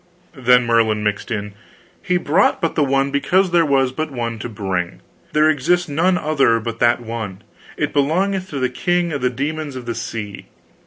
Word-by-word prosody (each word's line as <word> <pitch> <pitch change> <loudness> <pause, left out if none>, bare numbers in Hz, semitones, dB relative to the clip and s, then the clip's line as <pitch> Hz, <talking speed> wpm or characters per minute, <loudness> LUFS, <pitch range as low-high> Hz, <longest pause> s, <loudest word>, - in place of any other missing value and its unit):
Then 125 -2 +4
Merlin 115 -2 +2
mixed 105 +2 -2
in: 105 -3 -4 0.5
"He 180 -2 +1
brought 175 +3 +2
but 165 - -1
the 150 - +2
one 135 0 +1
because 180 +6 +2
there 170 -1 +4
was 135 -2 +2
but 155 +4 -3
the 140 - -12
one 115 -2 -3
to 120 - -5
bring. 95 -5 -3 0.3
There 150 +1 +4
exists 165 +4 +2
none 170 +5 +2
other 140 -8 +2
but 115 +1 -5
that 120 0 +3
one. 110 -4 -6 0.3
It 150 - -1
belongeth 185 +7 0
to 145 - -5
the 130 -1 +1
king 175 +5 0
of 140 - -3
the 125 - +2
Demons 145 +3 -4
of 125 -2 -7
the 120 - -2
Sea. 105 -4 -6
135 Hz, 195 wpm, -20 LUFS, 115-155 Hz, 0.5 s, Then